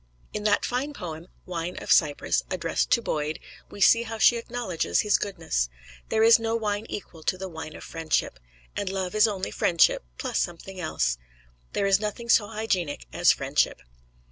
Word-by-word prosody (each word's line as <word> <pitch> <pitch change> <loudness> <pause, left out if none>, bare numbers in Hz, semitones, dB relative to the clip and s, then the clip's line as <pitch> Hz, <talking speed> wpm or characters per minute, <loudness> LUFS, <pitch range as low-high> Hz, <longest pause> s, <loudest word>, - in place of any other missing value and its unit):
In 210 0 -4
that 205 -1 +3
fine 265 +4 -2
poem, 165 - -7 0.2
"Wine 175 0 -4
of - - -4
Cyprus," 150 -3 +3
addressed - - -1
to 235 - +3
Boyd, 150 -3 -2 0.3
we - - -11
see 230 +4 +6
how 225 -1 -5
she 240 - +6
acknowledges 230 -7 -1
his 210 - +2
goodness. 165 - -1 0.4
There 220 0 +2
is 230 +1 +7
no 225 0 -1
wine 215 -1 -2
equal 170 -5 -7
to 185 - 0
the 190 +1 -5
wine 160 -3 -8
of - - -10
friendship; 160 - -2 0.4
and 200 - -2
love 190 -2 -3
is 215 +1 +5
only 195 -3 -3
friendship 170 - +3
plus - - -1
something 185 +2 -4
else. 60 - -1 0.5
There 200 - 0
is 195 -1 +4
nothing 220 +3 -4
so 210 -2 +5
hygienic 195 - -2
as - - +5
friendship. - - 0
195 Hz, 175 wpm, -26 LUFS, 165-220 Hz, 0.5 s, is